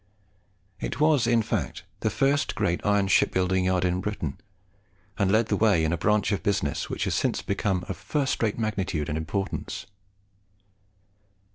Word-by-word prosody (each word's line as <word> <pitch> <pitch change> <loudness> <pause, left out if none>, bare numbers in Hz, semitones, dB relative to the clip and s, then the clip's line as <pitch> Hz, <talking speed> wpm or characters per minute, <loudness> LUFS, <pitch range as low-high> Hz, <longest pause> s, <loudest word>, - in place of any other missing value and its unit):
It 115 - -4
was 150 -5 +4
in 115 -1 +3
fact 110 - -3 0.2
the - - 0
first 140 +1 +1
great 100 -5 0
iron 105 -1 +2
shipbuilding 95 -1 +2
yard 95 -1 +2
in 90 +1 0
Britain, 90 -9 -4 0.8
and 100 -2 +2
led 110 +2 +4
the 105 - +2
way 100 -6 +3
in 80 +1 +1
a - - +2
branch 105 +3 +2
of 100 - 0
business 100 -8 -1
which - - -2
has - - 0
since - - 0
become 100 -2 -1
of - - -4
first 140 -3 -1
rate 110 -3 +1
magnitude 95 -9 -2
and 75 - -2
importance. 95 +2 -3
100 Hz, 160 wpm, -26 LUFS, 90-110 Hz, 0.8 s, was